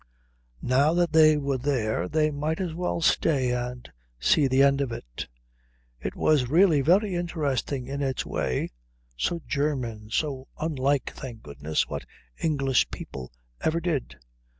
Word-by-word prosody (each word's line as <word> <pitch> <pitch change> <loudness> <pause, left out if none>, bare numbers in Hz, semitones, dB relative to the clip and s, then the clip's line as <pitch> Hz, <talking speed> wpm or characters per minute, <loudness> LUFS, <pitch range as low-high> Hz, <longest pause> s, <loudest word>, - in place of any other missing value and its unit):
Now 140 +5 +3
that 175 -2 +2
they 155 -1 +7
were 140 -2 -1
there 110 -9 0
they 155 -1 +2
might 150 +2 -2
as 180 -4 -2
well 175 0 -2
stay 135 -6 +2
and 125 0 -3 0.3
see 140 - +4
the 130 +1 +4
end 140 0 +4
of 135 -4 -1
it. - - -7 0.7
It - - -4
was 140 -6 +2
really 165 -1 +5
very 190 +7 +3
interesting 145 -7 -2
in 140 +2 -4
its 135 -2 -1
way; 65 - -2 0.4
so 165 - -1
German; 125 -8 -2
so 135 +1 -2
unlike, 140 -3 0
thank 120 -5 -9
goodness, 75 +2 -2
what - - -6 0.3
English 140 -5 +2
people 65 -1 -8 0.3
ever 160 +1 +1
did. 165 -6 -2
140 Hz, 145 wpm, -26 LUFS, 125-155 Hz, 0.7 s, they